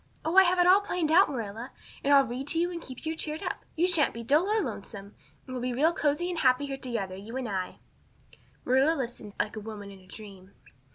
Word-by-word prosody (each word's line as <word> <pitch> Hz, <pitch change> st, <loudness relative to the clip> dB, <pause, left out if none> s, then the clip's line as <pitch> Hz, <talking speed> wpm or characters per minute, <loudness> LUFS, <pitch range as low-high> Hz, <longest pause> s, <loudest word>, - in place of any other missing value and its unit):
Oh, 320 Hz, +3 st, -1 dB
I 385 Hz, -, +10 dB
have 360 Hz, +1 st, +2 dB
it 355 Hz, -, +4 dB
all 375 Hz, +3 st, +6 dB
planned 360 Hz, -6 st, -1 dB
out, 370 Hz, +2 st, +6 dB
Marilla. 230 Hz, -2 st, -5 dB, 0.3 s
And 280 Hz, -, +1 dB
I'll 275 Hz, -1 st, +7 dB
read 255 Hz, +3 st, -5 dB
to 330 Hz, -, +2 dB
you 350 Hz, +1 st, 0 dB
and 340 Hz, -1 st, -6 dB
keep 260 Hz, +1 st, -10 dB
you 320 Hz, +1 st, -2 dB
cheered 310 Hz, 0 st, -5 dB
up. -, -, -4 dB
You 345 Hz, +3 st, +2 dB
sha'n't 335 Hz, -9 st, +3 dB
be 230 Hz, -, -6 dB
dull 295 Hz, -, +3 dB
or 435 Hz, +1 st, +2 dB
lonesome. 200 Hz, -, -6 dB, 0.3 s
And 255 Hz, -, -8 dB
we'll 250 Hz, -, -4 dB
be 250 Hz, 0 st, -2 dB
real 310 Hz, +7 st, +2 dB
cozy 300 Hz, +2 st, 0 dB
and 345 Hz, -, -3 dB
happy 255 Hz, +1 st, +3 dB
here 275 Hz, -1 st, -5 dB
together, 230 Hz, -8 st, -4 dB
you 215 Hz, +6 st, -7 dB
and 260 Hz, -2 st, -3 dB
I." 190 Hz, -3 st, -4 dB, 0.9 s
Marilla 265 Hz, +5 st, +3 dB
had -, -, -4 dB
listened 235 Hz, -5 st, -6 dB
like 215 Hz, -, -1 dB
a -, -, -4 dB
woman 205 Hz, -2 st, -8 dB
in 195 Hz, -, -13 dB
a 185 Hz, -, -20 dB
dream. 195 Hz, -1 st, -12 dB
265 Hz, 245 wpm, -28 LUFS, 220-325 Hz, 0.9 s, I